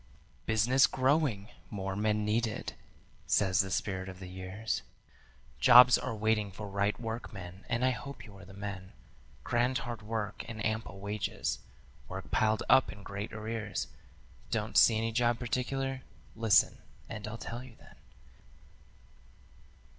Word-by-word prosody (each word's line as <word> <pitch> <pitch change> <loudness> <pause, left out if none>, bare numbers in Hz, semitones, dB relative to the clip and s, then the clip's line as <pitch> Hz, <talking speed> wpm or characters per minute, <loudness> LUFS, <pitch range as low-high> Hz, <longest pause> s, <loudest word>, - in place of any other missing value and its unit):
"Business 120 +5 +4
growing, 130 -6 +1 0.2
more 95 -2 -4
men 105 +1 +1
needed," 110 +1 -1 0.5
says 95 -2 +3
the 95 - +2
Spirit 95 0 -2
of 95 - -9
the 95 - -8
Years, 95 +4 -4 0.8
"Jobs 125 +1 +9
are 130 - -2
waiting 110 -1 +1
for 105 +3 -7
right 100 +1 0
workmen, 100 -6 -6
and 120 +2 +1
I 130 - +4
hope 140 +2 -7
you 100 - -13
are - - -12
the 95 +1 -13
men, 100 -2 -6 0.5
Grand 125 +2 +1
hard 120 -2 -5
work 110 -1 -3
and 110 -2 -5
ample 110 -3 -2
wages, 100 +1 -2 0.5
work - - -7
piled 110 0 +2
up 130 0 +5
in 100 - -11
great 100 +2 -5
arrears 110 -1 -4 0.6
'Don't - - -2
see 110 - +7
any 115 +1 0
job 120 0 +2
particular?' 130 +2 -2 0.3
Listen, 110 -2 +4 0.3
and 105 0 -6
I'll 110 +1 -5
tell 120 +2 -6
you 125 -3 -13
then. - - -18
110 Hz, 140 wpm, -31 LUFS, 100-120 Hz, 0.8 s, Jobs